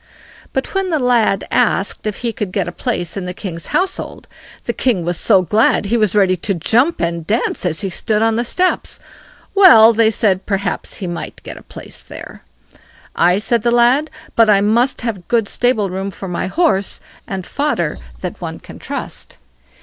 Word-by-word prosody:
But 265 - -3
when 385 -1 0
the 320 - +1
lad 235 -7 +2
asked 200 +2 +1
if 210 - -3
he 230 - 0
could 205 -4 -4
get 190 -2 -1
a - - -3
place 175 -5 -3
in 195 -2 -4
the 180 0 -5
king's 170 -5 -6
household, 380 +1 -2 0.4
the - - -1
king 215 -10 0
was 175 +1 -1
so 190 +2 +3
glad 210 +2 +2
he 215 +4 0
was 215 -4 +1
ready 190 -3 +4
to 195 +3 -2
jump 240 - +2
and 170 -1 -2
dance 215 -3 0
as 165 -2 -2
he 195 -2 -3
stood 215 +4 0
on 225 0 +2
the 235 - 0
steps. 365 +9 -1 0.5
Well, 275 - +8
they 225 0 +4
said, 200 -4 0
perhaps 195 -2 -2
he 195 - -6
might 175 -1 -6
get - - -7
a - - -12
place - - -9
there. - - -11 0.7
"Aye", 180 +2 +3
said 230 +2 0
the 235 - +1
lad, 240 +6 +3 0.3
"but 225 -1 +5
I 200 -2 +5
must 235 +6 +1
have 215 -7 -4
good 230 -3 +1
stable 220 -6 0
room 190 +1 -3
for 195 0 -8
my 180 +1 -3
horse, 200 - +1 0.3
and 190 -2 -5
fodder 280 - -1 0.2
that - - -6
one - - -5
can - - -13
trust." - - -6
210 Hz, 190 wpm, -17 LUFS, 185-240 Hz, 0.7 s, Well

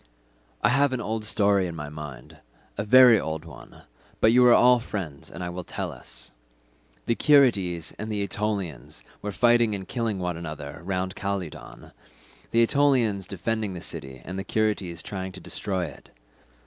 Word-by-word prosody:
"I - - +5
have 140 +1 +3
an 130 - -1
old 110 -1 -3
story 100 -3 +2
in 85 - -6
my 75 -2 -6
mind—a 75 +1 -9
very 125 0 +8
old 80 -1 -4
one—but 65 - -3
you 125 +1 +6
are 120 - +8
all 125 0 +6
friends 95 - -6
and - - -7
I 90 - -3
will 90 +1 -6
tell - - -4
it. - - -8 0.7
The 115 - +2
Curetes 105 - +3
and 110 +1 -4
the 105 -1 -1
Aetolians 100 - -4 0.2
were 105 - -3
fighting 120 0 +3
and 95 -2 -7
killing 115 -4 -2
one 90 -2 -3
another 75 -2 -7
round 95 +1 -2
Calydon—the 100 +3 -6
Aetolians 115 -8 +2
defending 105 0 -2
the - - -5
city 65 -8 -7
and 95 +2 -5
the - - -3
Curetes 100 -6 -1
trying 95 -2 -5
to 95 - -8
destroy 95 -2 -3
it. 70 -5 -12
95 Hz, 160 wpm, -26 LUFS, 85-110 Hz, 0.7 s, very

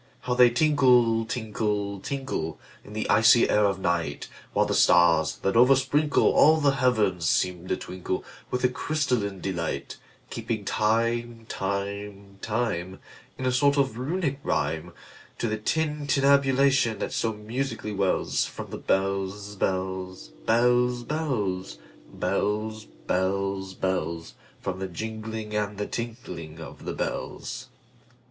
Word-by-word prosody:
How 125 -1 -1
they 125 0 +7
tinkle, 125 -4 +4
tinkle, 105 -3 -2
tinkle, 130 - -4 0.2
In 105 - -12
the 110 - -2
icy 115 +1 +6
air 105 0 +3
of 100 -1 +1
night! 85 -5 -2 0.2
While - - +2
the - - -1
stars, 85 -1 +4
that 95 - +1
oversprinkleAll 145 +4 +4
the 140 - +5
heavens, 110 - +1
seem 90 -1 0
to - - 0
twinkleWith 95 +7 -5
a - - +6
crystalline 125 - -1
delight; 85 -4 -3 0.3
Keeping 110 -3 -3
time, 115 +2 0
time, 100 0 -4
time, 95 -5 -2 0.4
In 130 - -4
a 130 - +2
sort 140 +3 +3
of 135 -4 +1
Runic 140 0 -1
rhyme, 80 +3 -1 0.5
To - - -1
the 110 0 -2
tintinnabulation 140 -3 +2
that - - -4
so 115 -1 0
musically 110 0 -4
wellsFrom 100 -2 -1
the - - -4
bells, 95 +1 -1
bells, 95 -6 -3 0.2
bells, 125 +1 +3
bells, 105 - -2 0.3
Bells, 110 +1 -1
bells, 95 +1 -2
bells—From 90 +1 -4
the 95 - -3
jingling 110 +3 -5
and 105 -1 -1
the 105 - -2
tinkling 90 -10 -6
of 80 - -10
the - - -3
bells. - - -4
110 Hz, 120 wpm, -26 LUFS, 95-125 Hz, 0.5 s, they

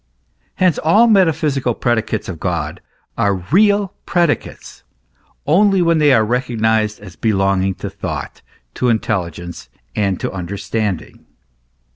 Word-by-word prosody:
Hence 185 -4 +2
all 205 +9 +4
metaphysical 155 - +2
predicates 110 -3 -1
of 85 -4 -6
God 80 -4 -3 0.4
are 100 -1 +2
real 200 - +2
predicates 170 -5 -1 0.6
only 195 +5 +4
when 165 -1 +3
they 150 -2 +5
are 110 -4 +4
re 120 +3 +1
cognised 110 -3 0
as 95 -4 -11
belonging 95 -3 +1
to - - -6
thought, - - -6 0.3
to 125 - 0
intelligence, 85 - -3 0.2
to 100 -3 0
the - - -3
un 90 -2 -5
derstanding. 100 -1 -3
110 Hz, 125 wpm, -18 LUFS, 95-160 Hz, 0.6 s, they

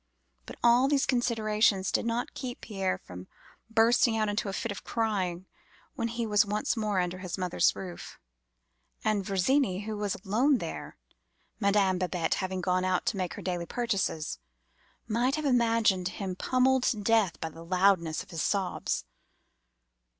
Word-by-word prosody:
But - - -8
all 240 +2 +5
these 280 -1 +2
considerations 215 -5 +1
did - - 0
not 235 +1 -2
keep 255 0 -6
Pierre 195 -3 -2
from 90 - -11 0.4
bursting 225 +1 +4
out 215 -1 +1
into 205 0 -1
a - - -4
fit 230 +1 -3
of 200 - -7
crying 190 -6 -1 0.5
when 235 -6 -2
he 235 0 -3
was 210 -2 +4
once 210 +3 -1
more 210 -4 0
under 180 0 -2
his 185 -1 -5
mother's 180 -2 +2
roof; 180 -2 -8 0.9
and 215 -2 +1
Virginie, 195 +2 +1
who 215 +1 -4
was 205 -2 -2
alone 250 +8 +3
there - - -6 0.6
(Madame 200 -3 +2
Babette 180 -3 0
having 185 0 -3
gone 185 0 +1
out 185 -1 0
to 210 - 0
make 185 -2 -2
her 205 - -8
daily 175 -1 -2
purchases), 200 - -2 0.7
might 240 +5 +1
have 310 -1 -3
imagined 230 -7 +3
him 190 -1 -4
pommeled 255 +5 +2
to 220 - +1
death 210 -3 +2
by 160 - -3
the 165 +1 -12
loudness 180 -2 +2
of - - -18
his 165 -2 -3
sobs. 190 - -1
205 Hz, 160 wpm, -29 LUFS, 185-230 Hz, 0.9 s, all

